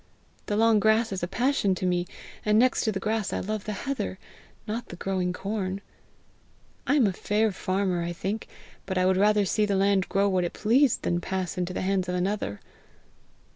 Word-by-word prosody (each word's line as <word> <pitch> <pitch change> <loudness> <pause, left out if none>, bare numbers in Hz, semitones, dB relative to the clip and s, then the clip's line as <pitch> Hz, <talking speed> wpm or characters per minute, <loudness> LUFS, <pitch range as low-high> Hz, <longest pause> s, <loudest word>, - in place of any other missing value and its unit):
The 205 - 0
long 225 -1 +5
grass 220 +2 +3
is 190 - -3
a 175 - -1
passion 230 -1 +1
to 185 - -3
me, 180 -1 0 0.4
and 210 0 +3
next 255 +3 +4
to 220 - +2
the 195 - -3
grass 215 0 -1
I - - -1
love 215 +1 -3
the 215 - -3
heather, 255 -9 -2 0.5
not 230 +3 -3
the - - -8
growing 185 0 -1
corn. 195 0 -3 1.1
I 285 - +3
am 275 -6 +5
a 195 - +1
fair 210 +3 +1
farmer, 185 -1 -1
I 170 0 -2
think, 195 +5 -4 0.4
but 190 -1 -2
I 185 - +3
would 185 0 +3
rather 210 +1 +4
see 210 +3 +1
the 200 - +1
land 195 -1 +2
grow 200 +1 +2
what 185 -2 +1
it 175 - -3
pleased, 245 +4 +3
than 175 0 0
pass 185 0 -3
into 180 0 -2
the - - -3
hands 185 -1 0
of 180 - -1
another. 180 - -2
195 Hz, 205 wpm, -27 LUFS, 185-215 Hz, 1.1 s, long